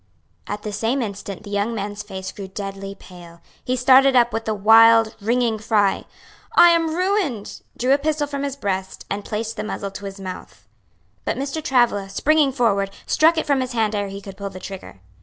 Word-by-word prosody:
At 205 0 -5
the 210 - -5
same 240 +5 0
instant 200 -2 -7
the 205 - -10
young 205 +3 -1
man's 205 0 -4
face 190 -3 -7
grew 195 -2 -8
deadly 195 0 -6
pale, 175 -3 -14 0.2
he 255 - -1
started 260 +2 +5
up 240 -1 +4
with 225 0 -3
a 220 - +1
wild, 225 +2 +6
ringing 230 0 +1
cry, 210 -2 +1 0.5
"I 345 - +8
am 330 -2 +2
ruined!" 360 - -1 0.2
drew 255 +2 +2
a 280 - +2
pistol 300 0 0
from 280 -1 -5
his 280 -1 -3
breast, 190 -7 -4
and 200 +1 -2
placed 220 +2 -4
the - - -3
muzzle 200 -2 -5
to 200 +1 -8
his 195 0 -7
mouth. 185 -1 -9 0.6
But - - -2
Mr. 275 +3 -3
Travilla, 240 -8 +2
springing 290 +7 +2
forward, 210 -7 +1 0.2
struck 325 +2 +3
it 320 - 0
from 280 -3 +1
his 255 -1 -4
hand 220 -2 0
ere 205 -1 -1
he 195 0 -8
could 195 -1 -10
pull 200 -1 -5
the 185 -1 -10
trigger. 185 - -9
220 Hz, 200 wpm, -21 LUFS, 200-265 Hz, 0.6 s, I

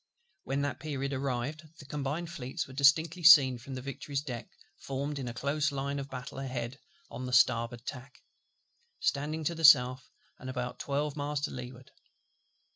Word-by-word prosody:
When 140 +1 -1
that 145 - -2
period 140 -1 -3
arrived, 135 +2 -2 0.2
the 145 - -12
Combined 150 +4 -3
Fleets 130 -5 -4
were 130 - -13
distinctly 155 +5 +3
seen 140 -7 +8
from 130 +3 -8
the 130 - -6
Victory's 140 +1 -4
deck, 125 -5 -6 0.3
formed 140 +2 -4
in 130 - -4
a 120 - -4
close 145 +3 0
line 140 0 -2
of 140 0 -6
battle 130 +1 -7
ahead 130 -1 -4 0.3
on 130 - -5
the - - -5
starboard 115 -1 +3
tack, 130 +1 -8 0.8
standing 155 +2 -1
to 170 - 0
the 165 0 -6
south, 130 -4 +6 0.3
and 130 - -7
about 125 -1 -4
twelve 145 +1 -2
miles 145 0 -2
to 150 - -2
leeward. 125 0 -9
140 Hz, 170 wpm, -30 LUFS, 130-145 Hz, 0.8 s, seen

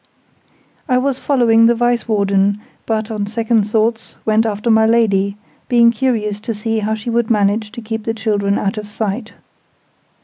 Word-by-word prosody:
I 250 - +3
was 265 0 0
following 230 -5 +3
the 235 - +3
Vice 240 0 0
Warden, 200 -1 +1 0.3
but, 220 0 -2
on 210 -2 -3
second 225 0 +1
thoughts, 220 +1 -1
went 220 +1 +2
after 215 +2 -1
my 220 0 +4
Lady, 200 -3 +2 0.3
being 235 -1 +5
curious 220 -4 -1
to 225 +1 -5
see 225 +1 -2
how 215 +1 -1
she 220 +2 -5
would 235 -1 0
manage 210 0 +1
to 235 -2 -8
keep 220 0 -5
the 225 - -2
children 205 -2 0
out 200 +1 -2
of 210 - -8
sight. 215 +1 -4
220 Hz, 170 wpm, -17 LUFS, 210-230 Hz, 0.3 s, being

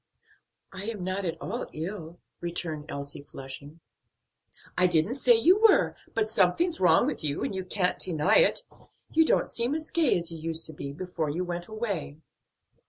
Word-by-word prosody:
"I 195 +1 -6
am 215 -4 -4
not 185 +1 -2
at 165 -1 -3
all 235 +8 -4
ill," 170 0 -6 0.2
returned 165 -3 -3
Elsie, 140 0 -6
flushing. 140 +3 -9 0.9
"I 180 - +4
didn't 175 +5 +2
say 250 -3 +4
you 355 - +4
were, 445 -3 +5 0.2
but 220 -1 +1
something's 220 - +2
wrong 175 -3 +5
with - - -3
you, 145 -1 -1
and - - -2
you 190 -1 -3
can't 180 0 +1
deny 160 -5 +3
it; - - +4 0.5
you 320 - +5
don't - - +3
seem 240 +5 -1
as 315 0 -4
gay 320 - +3
as 170 0 -4
you 165 - -7
used 165 0 -3
to 160 - -7
before 155 +3 -4
you 170 +5 -2
went 175 -1 -4
away." 210 -10 -4
180 Hz, 170 wpm, -28 LUFS, 160-220 Hz, 0.9 s, were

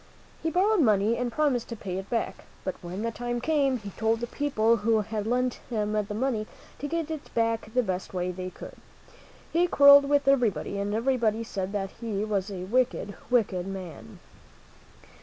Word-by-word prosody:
He 325 - 0
borrowed 390 +5 +3
money 215 -2 +3
and 245 0 -2
promised 270 -3 +1
to 230 - -4
pay 190 -3 -4
it 195 - -9
back; 230 - -2 0.2
but 185 - -2
when 180 +4 -5
the 230 - -1
time 240 +1 -3
came, 275 -1 +2
he 205 -3 -8
told 225 +3 0
the 240 - -2
people 235 -4 +1
who 220 +1 +2
had 215 0 -4
lent 250 +1 0
him 210 -3 -1
the 210 -1 -1
money 225 -3 -1 0.3
to 290 - -3
get 330 0 -2
it 310 -2 -6
back 230 -1 0
the 250 - +4
best 185 -3 -3
way 180 -1 -2
they 185 0 -5
could. - - -11 0.8
He 345 +2 +3
quarreled 280 -3 +8
with 285 -1 +2
everybody, 220 - +2
and 205 +1 -1
everybody 230 -2 +1
said 195 -3 -4
that 195 -1 -2
he 215 -3 -2
was 205 -2 -1
a 185 -3 -5
wicked, 230 -1 0 0.2
wicked 195 -7 +1
man. 190 -4 -8
225 Hz, 185 wpm, -27 LUFS, 200-255 Hz, 0.8 s, quarreled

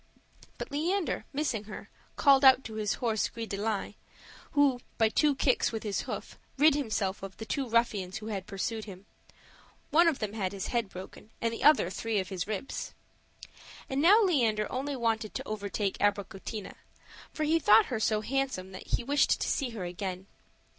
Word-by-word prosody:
But - - -6
Leander, 335 +5 -1
missing 270 -7 -2
her, 210 - -9 0.2
called 280 -2 +5
out 265 0 +7
to 220 - -8
his 215 -2 -1
horse 225 -3 0
Gris 230 -1 -6
de 200 - -3
line; 205 -1 -2 0.6
who, 285 -4 +3 0.2
by 225 -1 +4
two 290 +5 +2
kicks 260 -1 +2
with 225 -1 -4
his 205 -2 -1
hoof, - - -6 0.2
rid 300 +2 +6
himself 215 -8 -1
of 195 0 -8
the 220 - -7
two 265 +2 -2
ruffians 215 -5 +1
who 215 - -8
had 200 -3 -4
pursued 215 +3 -3
him: 195 -2 -11 0.9
one 335 +3 +6
of 320 -5 +2
them 215 -2 -4
had 200 -3 -2
his 195 -2 -4
head 235 -4 -1
broken 190 +3 -10
and 230 0 -1
the 230 - -5
other 290 - +5
three 225 +3 -2
of 190 -2 -1
his 185 -2 -3
ribs. 215 +5 -5 1.0
And 270 +1 +1
now 410 +8 +7
Leander 230 - +2
only 275 +3 -2
wanted 225 -3 -1
to - - -4
overtake 205 -1 -3
Abricotina; 205 0 -2 0.6
for 310 - -3
he 320 +2 +3
thought 220 -7 +6
her 225 - 0
so 215 0 +1
handsome 260 -6 -2
that 185 - -10
he - - -1
wished 285 +4 +2
to - - -1
see 270 -4 0
her 225 -5 -6
again. 185 +1 -5
220 Hz, 185 wpm, -29 LUFS, 200-270 Hz, 1.0 s, out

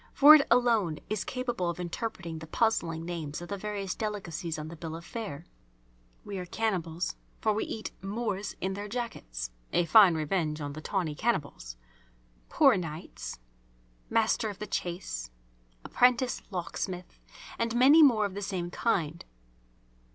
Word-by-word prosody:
For 290 +2 +10
it 300 -2 +6
alone 230 -9 +3
is 215 -2 0
capable 250 - -2
of 170 - -4
interpreting 175 -2 -4
the 160 - -9
puzzling 165 -6 0
names 160 -4 -4
of 175 - -9
the 200 - -2
various 200 -1 -3
delicacies 180 -6 -4
on 155 0 -5
the 165 - -8
bill 160 -1 -6
of 170 +1 -9
fare. 195 -9 -6 0.8
We 200 -2 -5
are 180 - -5
cannibals, 175 -6 -1 0.2
for 215 - +2
we 210 - -1
eat 220 - -5
"Moors 205 -1 -3
in 190 +1 -1
their 205 +2 -5
'Jackets'" - - -5 0.2
(a 175 - +2
fine 185 0 +7
revenge 155 0 -1
on 145 -1 -4
the 155 - -7
tawny 175 -3 -1
cannibals!) 145 - -2 0.7
"poor 275 -8 +5
knights," 150 - -6 0.7
"master 225 0 +2
of 205 - -7
the 210 - -5
chase," 170 - -4 0.6
"apprentice 250 0 +3
locksmith," 180 -1 -5 0.4
and 230 0 0
many 275 +6 +7
more 235 -8 +6
of 200 - -4
the 200 - -5
same 185 -3 -3
kind. 170 -8 0
190 Hz, 150 wpm, -29 LUFS, 165-220 Hz, 0.8 s, For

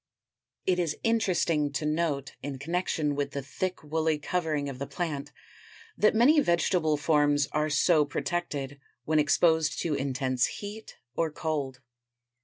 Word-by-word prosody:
It 180 -1 +2
is 165 -4 -1
interesting 175 -10 +1
to 150 +2 -2
note 150 -3 -1
in 140 -1 -5
connection 155 0 -1
with 140 0 -2
the 140 - -3
thick 185 +7 -4
woolly 160 +1 0
covering 155 -2 -1
of 135 -2 -6
the 140 - -4
plant 145 -1 -4 0.6
that 215 - +3
many 275 +8 +6
vegetable 170 - +2
forms 145 -1 +3
are 150 0 0
so 155 +1 +4
protected 145 -3 -3 0.3
when 155 0 +2
exposed 160 0 +3
to 165 - -1
intense 130 -2 0
heat 210 +2 -8 0.2
or 165 -1 +1
cold. 145 -4 -3
155 Hz, 140 wpm, -28 LUFS, 145-170 Hz, 0.6 s, many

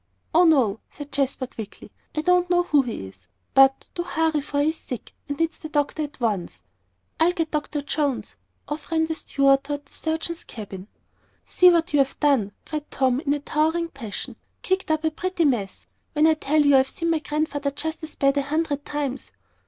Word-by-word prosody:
"Oh, 350 +3 +6
no," 250 -10 +4
said 290 -1 -10
Jasper, 275 -1 0
quickly, 220 -4 -10 0.3
"I - - +2
don't 360 +1 +3
know 355 0 +4
who 300 -5 +4
he 235 - -5
is. 95 -1 -17 0.3
But, 270 0 +5
do 345 - -2
hurry, 320 -3 0
for 285 0 -3
he's 315 +3 +1
sick, 250 - -7 0.2
and 285 - -2
needs 330 0 -1
the 310 - -7
doctor 295 +1 0
at 295 -2 -5
once." 190 - -2 0.6
"I'll 340 +2 +4
get 330 -2 -2
Dr. 295 -1 -2
Jones." 290 -3 -1 0.3
Off 300 +2 -6
ran 320 -1 +3
the 320 - -2
steward 275 -3 +2
toward 290 0 -4
the - - -21
surgeon's 325 +1 -2
cabin. 200 -3 -8 0.6
"See 360 - +6
what 340 -1 +2
you've 275 -2 +2
done," 270 -9 +3
cried 305 -1 -5
Tom, 260 -1 +1
in 285 -1 -1
a - - -3
towering 320 +3 0
passion. 235 -9 -7 0.3
"Kicked 375 -2 0
up 315 0 +1
a 315 - +1
pretty 355 +1 -1
mess 225 -9 -1 0.3
when 300 0 +4
I 320 - +6
tell 305 -1 +2
you 285 -1 +6
I've 265 0 +3
seen 335 +3 -1
my 325 - +2
Grandfather 295 -2 -1
just 315 +3 -4
as 315 -1 -7
bad 275 0 +2
a - - +3
hundred 290 0 -1
times." 285 -3 -3
295 Hz, 195 wpm, -24 LUFS, 270-320 Hz, 0.6 s, Oh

